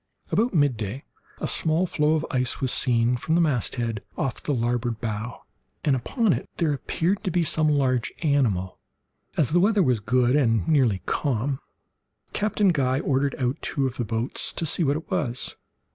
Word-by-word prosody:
About 235 +3 +2
midday 130 - 0 0.4
a - - -2
small 160 +3 +2
floe 155 -2 +1
of 160 0 -1
ice 125 -2 0
was 130 -3 0
seen 120 -1 +2
from 160 +6 -1
the 175 - +4
masthead 120 -7 -1 0.2
off 130 - -2
the - - -2
larboard 120 -2 -1
bow, 110 0 -5 0.4
and 140 -3 +3
upon 215 - +1
it - - -4
there 160 -3 +1
appeared 175 +8 -1
to 190 - -1
be 175 0 +1
some 155 0 +3
large 130 -5 +1
animal. 115 - +1 0.6
As 150 -4 +3
the 175 - +4
weather 205 +1 +3
was 125 -6 +2
good 125 +4 +2
and 115 -7 +2
nearly 130 -11 +2
calm, 135 0 -1 0.7
Captain 210 -1 +1
Guy 135 -5 +1
ordered 140 -1 0
out 130 +4 -1
two 140 -3 -1
of 130 -2 -3
the 120 - -1
boats 115 +3 -2
to 165 - -2
see 165 +3 +2
what 145 0 +2
it 160 - -10
was. 125 -4 -1
135 Hz, 175 wpm, -25 LUFS, 120-155 Hz, 0.7 s, the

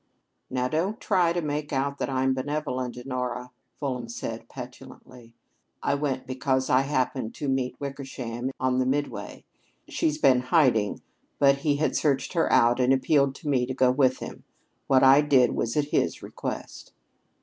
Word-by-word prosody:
"Now, 125 -1 -1
don't 175 +10 -1
try 180 -5 +2
to 175 0 -1
make 150 0 -3
out 140 0 -1
that - - -2
I'm 130 0 +1
benevolent, 130 -2 -3
Honora," 125 -1 -4 0.2
Fulham 125 -4 -4
said 115 -1 -6
petulantly. 125 -2 -11 0.5
"I 140 - +1
went 140 -3 -2
because 130 0 -1
I 130 - +5
happened 130 -4 -1
to 145 - -4
meet 130 -2 -1
Wickersham 130 -3 -5
on 130 0 +1
the 130 - +1
Midway. 145 +2 -3 0.4
She's 150 -1 0
been 135 -4 +4
hiding, 125 -6 +2 0.3
but 140 -1 +4
he 145 +1 +1
had 150 -1 0
searched 140 0 0
her 165 -2 +1
out 120 +1 +4
and 125 +1 +3
appealed 135 0 +2
to 150 - -10
me 130 -4 +1
to 130 - -4
go 130 -1 +4
with 130 -1 +2
him. - - -8 0.4
What 130 -1 +4
I 135 +2 +7
did 135 -4 +4
was 115 +4 -2
at 145 -1 +1
his - - 0
request." - - -7
130 Hz, 165 wpm, -26 LUFS, 125-145 Hz, 0.5 s, I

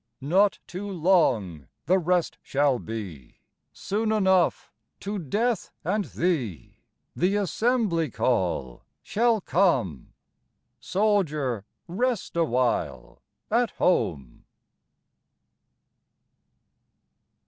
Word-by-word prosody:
Not 190 +8 +3
too 195 +3 -6
long 140 - +1 0.2
the 185 +4 +3
rest 180 0 0
shall 140 -2 +1
be. 95 - -7 0.4
Soon 215 +2 -2
enough, 190 -5 +2 0.3
to 205 +1 -3
Death 215 - -1
and 200 +5 0
thee, 135 - -2 0.4
The 185 +4 +1
assembly 205 - +1
call 90 - -1 0.2
shall 230 -1 +1
come. 170 - 0 0.7
Soldier, 155 - 0 0.2
rest 230 +4 -2
awhile 125 - -1 0.3
at 235 +1 +3
home. 70 - 0
175 Hz, 80 wpm, -26 LUFS, -, 0.7 s, Not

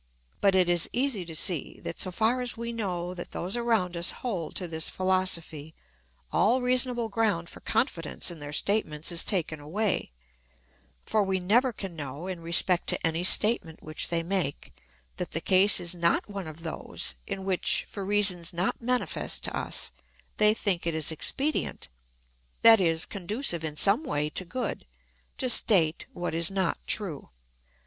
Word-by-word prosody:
But 195 -1 +3
it 185 -2 +4
is 175 -1 +1
easy 245 -7 0
to 165 -1 -7
see 170 -2 +1
that, - - -5
so 185 - +1
far 225 +7 +1
as 245 -1 -1
we 235 0 -4
know 180 -5 -3
that 175 -1 -8
those 185 +5 -1
around 225 -7 0
us 170 +1 +2 0.2
hold 180 -10 -3
to 180 - -1
this 160 -1 -1
philosophy, 170 -5 0 0.6
all 240 +5 +3
reasonable 250 -2 +1
ground 205 -6 0
for - - -11
confidence 180 - -1
in 170 - -9
their 145 0 -7
statements 155 -2 0
is 170 - +1
taken 165 -5 -2
away; 185 - -1 0.9
for 215 - +2
we 190 -1 0
never 235 +8 +3
can 195 -5 -7
know, 145 +1 -6
in 185 -2 -4
respect 170 +2 +2
to - - -1
any 165 +1 0
statement 185 -4 0
which 155 0 0
they 170 -1 0
make, 175 -5 -2 0.4
that - - -4
the - - 0
case 190 +2 +4
is 175 -1 -2
not 170 -1 +1
one 200 -4 -6
of 155 +1 -10
those 160 - -4
in 190 - -5
which, 190 -2 +2
for 200 - -6
reasons 190 -4 +1
not 180 +6 -2
manifest 250 +1 -1
to - - -3
us, - - -2 0.5
they 210 0 +6
think 185 -6 -1
it 165 - 0
is 160 0 -1
expedient 275 - -2 0.7
that 225 -3 +9
is, 165 -2 +2
conducive 200 - 0
in 150 -1 -4
some 200 - +5
way 150 - -2
to 185 - -1
good 240 - -4 0.5
to 260 - -1
state 180 -9 +4
what 175 -1 -4
is 165 0 0
not 190 -3 -1
true. 190 -9 -1
185 Hz, 170 wpm, -28 LUFS, 165-215 Hz, 0.9 s, that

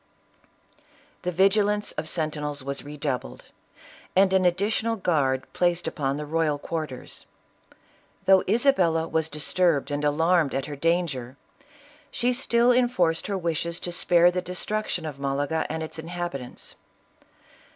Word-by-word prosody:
The 180 - -2
vigilance 205 +3 +2
of 155 +1 -5
sentinels 150 -3 -3
was 140 +1 -4
redoubled, 140 - -4 0.7
and 190 0 +4
an 190 -1 +3
additional 215 +5 0
guard 140 -9 0
placed 175 -1 +1
in 140 -3 -2
the 150 - -4
royal 155 -1 0
quarters. 150 -4 -6 1.0
Though 190 -1 +6
Isabella 185 - +3
was 160 -1 0
disturbed 150 -1 +1
and 145 +1 -2
alarmed 160 0 +2
at 135 - -1
her 150 - -6
danger, 140 -5 -1 0.7
she 250 +1 0
still 240 -1 +3
enforced 245 -10 +2
her 200 -2 -1
wishes 170 -1 -2
to 175 - -3
spare 175 0 +4
the 180 0 -2
destruction 180 0 -3
of 145 -3 -6
Malaga 140 +3 -1
and 160 +1 -3
its 160 +1 -6
inhabitants. 165 -6 -6
165 Hz, 130 wpm, -25 LUFS, 145-185 Hz, 1.0 s, Though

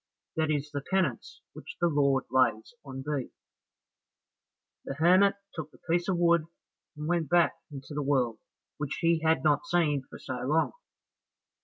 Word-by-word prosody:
That 160 -1 0
is 150 -1 -1
the 145 -1 -3
penance 175 -7 -2
which - - -10
the 175 - +2
Lord 140 -4 +2
lays 125 - +2
on 135 -2 -7
thee." 140 -3 -3
Then - - -40 1.5
the - - -5
hermit 185 +6 +5 0.2
took 160 -2 -6
the - - -20
piece 175 +1 -1
of 190 -2 +1
wood, 170 -2 +3 0.5
and 150 +1 -5
went 170 -4 0
back 175 +1 +4 0.2
into 140 0 -9
the 150 - -2
world, 130 -5 +1 0.4
which 145 -2 -3
he 170 -1 +3
had 160 -4 +2
not 145 -1 +2
seen 155 -5 +2
for - - -10
so 130 -1 -6
long. 150 +6 +1
150 Hz, 165 wpm, -29 LUFS, 135-170 Hz, 1.5 s, hermit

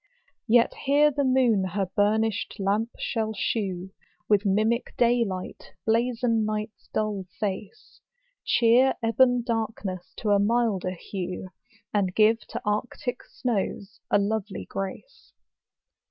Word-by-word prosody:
Yet 235 +1 +4
here 290 +2 +5
the 285 0 0
moon 255 -6 +3
her 190 +1 -1
burnished 215 +1 +1
lamp 205 +4 +1
shall 220 -2 -2
shew, 190 -3 -2 0.4
With 205 -1 +3
mimic 215 +5 +1
day 240 0 +4
light 185 -4 -6
blazon 230 0 +1
night's 215 0 -4
dull 210 -3 -1
face; 210 - -5 0.4
Cheer 240 +3 +4
ebon 245 +2 +3
darkness 220 -6 -3
to 215 - -1
a 200 - +5
milder 205 -4 +1
hue, 185 0 -5 0.4
And 190 -3 +1
give 220 +1 +5
to - - -5
arctic 225 +4 -2
snows 200 -4 -3
a - - +4
lovely 205 0 -2
grace. 195 - -7
215 Hz, 120 wpm, -26 LUFS, 200-235 Hz, 0.4 s, here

